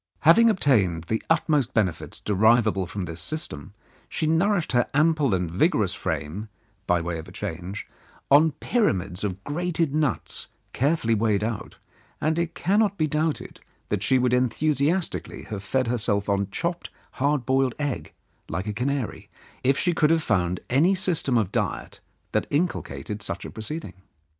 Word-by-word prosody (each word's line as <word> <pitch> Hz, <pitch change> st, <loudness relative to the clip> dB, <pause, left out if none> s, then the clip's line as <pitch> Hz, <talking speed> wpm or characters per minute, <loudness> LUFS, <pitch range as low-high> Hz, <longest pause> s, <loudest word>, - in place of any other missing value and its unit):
Having 225 Hz, +9 st, +7 dB
obtained 105 Hz, -, +2 dB
the 110 Hz, +5 st, -2 dB
utmost 150 Hz, -5 st, +2 dB
benefits 95 Hz, -7 st, -1 dB
deriv 110 Hz, +3 st, +4 dB
able 95 Hz, -4 st, 0 dB
from 95 Hz, +1 st, -4 dB
this 85 Hz, 0 st, -4 dB
system, 100 Hz, -, -5 dB, 0.3 s
she 160 Hz, -, -2 dB
nourished 175 Hz, +3 st, +2 dB
her 120 Hz, -1 st, +2 dB
ample 150 Hz, -6 st, +3 dB
and 90 Hz, -3 st, -2 dB
vigorous 105 Hz, -, +2 dB
frame, 80 Hz, +5 st, -4 dB, 0.4 s
by 90 Hz, -1 st, +3 dB
way 85 Hz, 0 st, -3 dB
of 80 Hz, -, -9 dB
a -, -, -11 dB
change, 95 Hz, 0 st, -5 dB, 0.4 s
on 150 Hz, +2 st, +6 dB
pyramids 100 Hz, -, 0 dB
of 95 Hz, -1 st, -3 dB
grated 165 Hz, -, -1 dB
nuts, 150 Hz, -5 st, -1 dB, 0.3 s
carefully 135 Hz, -4 st, +1 dB
weighed 105 Hz, -2 st, +1 dB
out, 110 Hz, -1 st, -4 dB, 0.4 s
and 160 Hz, +2 st, +1 dB
it 170 Hz, 0 st, -2 dB
cannot 205 Hz, +1 st, +2 dB
be 155 Hz, -, +2 dB
doubted 155 Hz, +1 st, -2 dB, 0.3 s
that 105 Hz, -, -1 dB
she 130 Hz, +5 st, +3 dB
would 125 Hz, -1 st, +2 dB
enthusiastically 145 Hz, -, 0 dB
have 105 Hz, -3 st, -6 dB
fed 130 Hz, +6 st, 0 dB
her 120 Hz, +1 st, 0 dB
self 100 Hz, -1 st, +1 dB
on 100 Hz, -1 st, 0 dB
chopped 170 Hz, -, -3 dB
up -, -, -29 dB, 0.3 s
hard 140 Hz, -2 st, +1 dB
boiled 130 Hz, -1 st, +2 dB
egg, 145 Hz, -3 st, -3 dB, 0.4 s
like 90 Hz, +4 st, -3 dB
a 105 Hz, -, -3 dB
canary, 130 Hz, +2 st, -2 dB, 0.3 s
if 135 Hz, +2 st, +3 dB
she 175 Hz, -, +2 dB
could 155 Hz, -2 st, +3 dB
have 165 Hz, -1 st, +3 dB
found 90 Hz, -, 0 dB
any 160 Hz, +10 st, +3 dB
system 170 Hz, -9 st, +1 dB
of 105 Hz, -4 st, 0 dB
diet -, -, -2 dB, 0.3 s
that -, -, 0 dB
in 160 Hz, +6 st, +3 dB
culcated 100 Hz, -, -6 dB
such 100 Hz, 0 st, -4 dB
a -, -, -7 dB
proceeding. 110 Hz, -, -6 dB
125 Hz, 165 wpm, -25 LUFS, 100-155 Hz, 0.4 s, Having